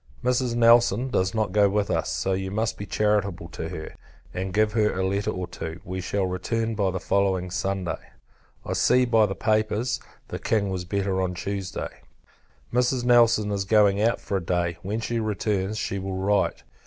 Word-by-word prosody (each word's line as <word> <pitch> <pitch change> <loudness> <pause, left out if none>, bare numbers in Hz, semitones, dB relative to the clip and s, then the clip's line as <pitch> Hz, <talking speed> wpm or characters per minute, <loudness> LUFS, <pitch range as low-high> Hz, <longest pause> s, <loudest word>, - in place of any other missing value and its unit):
Mrs. 125 -1 +1
Nelson 120 +1 +5
does 95 -2 0
not 110 -3 0
go 100 0 +4
with 100 0 0
us; - - 0
so 95 - -1
you 95 0 -2
must 110 +3 -1
be 100 - -7
charitable 100 -5 0
to 80 -1 -6
her, 80 -1 -7 0.4
and 95 +1 -3
give 105 +2 +2
her 105 -4 +1
a 95 - +1
letter 100 +1 0
or 90 0 -3
two. 80 0 -7
We 95 -2 -4
shall 95 +2 -1
return 115 +5 -2
by 100 -3 +1
the 95 0 -3
following 95 -2 0
Sunday. 95 -1 -2 0.7
I - - -2
see, 125 0 +4
by 115 -3 +4
the 95 - -4
papers, 110 +2 0 0.3
the - - -5
King 105 -3 0
was 90 -1 -3
better 95 0 -1
on 90 -1 -2
Tuesday. 95 +1 -5 0.7
Mrs. 125 0 +2
Nelson 115 -3 +4
is 100 -1 -1
going 100 0 +4
out 115 +2 +2
for 100 - -2
a 95 - -4
day; 85 -1 -1
when 105 +4 -3
she 115 +1 -2
returns, 105 -1 -1
she 100 -2 -2
will 95 0 -4
write. 100 +2 +1
100 Hz, 190 wpm, -25 LUFS, 95-110 Hz, 0.7 s, Nelson